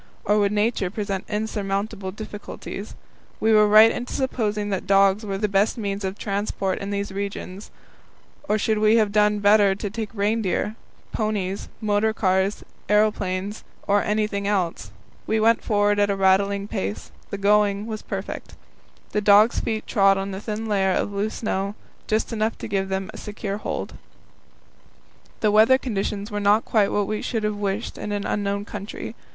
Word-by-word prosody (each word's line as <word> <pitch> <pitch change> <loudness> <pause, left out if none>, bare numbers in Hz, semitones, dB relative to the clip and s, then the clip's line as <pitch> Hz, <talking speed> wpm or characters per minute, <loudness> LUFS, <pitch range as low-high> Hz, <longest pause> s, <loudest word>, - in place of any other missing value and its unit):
Or 210 +1 +3
would 200 -1 +2
Nature 210 -2 +1
present 200 -1 -3
insurmountable 205 -1 -2
difficulties? 210 0 -8 0.4
Were 220 - +2 0.2
we - - -1
right 215 +1 +8
in 245 - -4
supposing 215 -6 -1
that 195 -2 -3
dogs 195 +1 +4
were 195 -2 -3
the 210 +1 0
best 200 +3 +1
means 200 -2 -3
of 190 +1 -3
transport 200 -1 -2
in 200 - -5
these 200 0 -3
regions, 200 0 -5 0.8
or 215 - +3
should 215 0 0
we 215 +1 +4
have 215 -3 +3
done 210 0 +3
better 205 -1 +4
to 205 +1 -4
take 220 -1 -4
reindeer, 210 0 0 0.4
ponies, 205 -3 -2
motor 215 +1 +1
cars, 190 -1 +1 0.3
aeroplanes, 210 -1 +1 0.2
or 205 0 +3
anything 210 -1 -1
else? 180 - -1 0.4
We 220 - +1
went 225 +1 +3
forward 205 -1 +2
at 205 0 +3
a 200 - +1
rattling 200 +1 +2
pace; 100 - -4 0.2
the 200 - -4
going 205 0 +2
was 220 -1 -5
perfect. 195 0 -6 0.6
The 210 - 0
dogs' 210 +3 +5
feet 220 -1 -3
trod 195 -1 +4
on 195 0 -3
a 190 - -5
thin 215 +1 -4
layer 195 -3 +1
of 205 - -1
loose 205 +2 -2
snow, 200 -2 -2 0.3
just 220 +2 0
enough 220 0 -1
to - - -6
give 195 -2 -1
them 190 0 -3
a - - -9
secure 205 -1 -5
hold. - - -4 1.5
The 215 - +3
weather 220 +5 +6
conditions 210 -4 -3
were 205 - -2
not 205 +2 +3
quite 210 -3 +2
what 205 -1 +1
we 215 +1 -3
should 225 -3 -2
have 210 0 0
wished 205 +1 -3
in 210 - -4
an 205 -1 -2
unknown 200 0 -1
country. 205 0 -7
205 Hz, 170 wpm, -23 LUFS, 195-215 Hz, 1.5 s, right